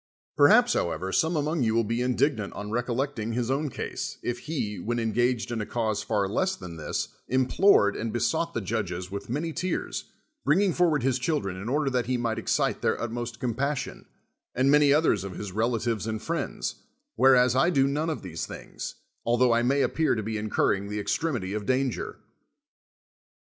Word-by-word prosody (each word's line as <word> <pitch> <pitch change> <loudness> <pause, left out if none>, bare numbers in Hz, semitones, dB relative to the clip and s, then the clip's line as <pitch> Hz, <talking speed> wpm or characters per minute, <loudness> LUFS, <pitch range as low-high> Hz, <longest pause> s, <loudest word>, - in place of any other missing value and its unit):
Perhaps, - - +6
how - - +1
ever, 95 +1 -4
some 160 - +2
among 155 +1 0
you 110 -2 +2
will 115 -1 +3
l)e 115 +2 0
indignant 125 -3 0
on 105 +1 -6
rec 120 +2 -1
ollecting 120 -3 -2
his 125 0 0
own 145 +2 0
case, - - -5
if 120 0 -2
he, 125 -9 -3
when 120 +2 -2
engaged 120 +1 0
in 115 -2 -2
a - - -3
cause 110 -3 -1
far 100 -3 0
less 185 - 0
than 90 -4 -9
this, 80 - -3 0.2
implored 130 - +4
and 115 0 -3
besought 165 +8 0
the 115 - 0
judges 95 -3 -3
with 100 +2 -6
many 155 +6 -2
tears, 185 +3 -2 0.4
bringing 185 +4 +3
forward 160 -6 +2
his 130 -1 +1
children 125 - -1
in 100 +5 -5
order 145 +2 +1
that 125 -3 0
he 130 0 +1
might 115 -2 -1
excite - - 0
their - - +1
utmost 120 0 -4
compassion, 130 +3 -2 0.5
and 130 +2 +3
many 145 -1 +5
others 145 - +3
of 95 -2 -6
his 105 0 -6
rela 115 +4 +1
tives 115 -2 -2
and 110 0 -3
friends, - - -3 0.4
whereas 125 0 +5
I 135 +6 +4
do 135 -6 +3
none 150 +4 -1
of 155 - -4
these 80 -3 -5
things, - - -7 0.3
altho 120 +1 +3
I 115 0 +3
may 135 +3 +2
appear 160 -4 +1
to 110 - -2
be 110 +1 -3
incurring 105 -1 0
the 105 0 -3
extremity 110 - -1
of 105 -1 -4
danger. 130 -1 -1
120 Hz, 190 wpm, -27 LUFS, 110-140 Hz, 0.5 s, Perhaps